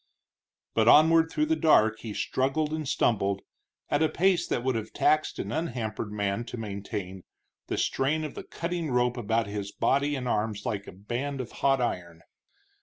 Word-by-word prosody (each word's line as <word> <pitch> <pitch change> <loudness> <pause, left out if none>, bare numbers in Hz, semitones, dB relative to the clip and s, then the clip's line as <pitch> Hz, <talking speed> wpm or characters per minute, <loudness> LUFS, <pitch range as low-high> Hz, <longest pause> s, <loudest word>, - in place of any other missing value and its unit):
But 110 0 +2
onward 160 +4 +6
through 305 - +1
the 320 +1 +1
dark 110 - +4
he 110 - -6
struggled 150 +4 0
and 155 -2 -3
stumbled, 100 -8 +1 0.4
at 145 - +1
a 160 - +3
pace 180 -1 +2
that 120 - -1
would 130 0 +1
have 110 -1 -4
taxed 155 0 +2
an - - -4
unhampered 115 -9 -3
man 105 +1 -1
to 120 - -7
maintain, 100 -3 -5 0.5
the - - -2
strain 150 +4 0
of 150 - -5
the - - -7
cutting 170 -1 -4
rope 125 -1 +2
about 115 -1 0
his 100 0 -5
body 140 +2 +1
and 130 -2 -4
arms 105 -2 -1
like 105 -5 -3
a - - -7
band 120 +9 -4
of 125 -2 -5
hot 135 -1 +2
iron. 85 -7 -3
120 Hz, 180 wpm, -28 LUFS, 105-150 Hz, 0.5 s, onward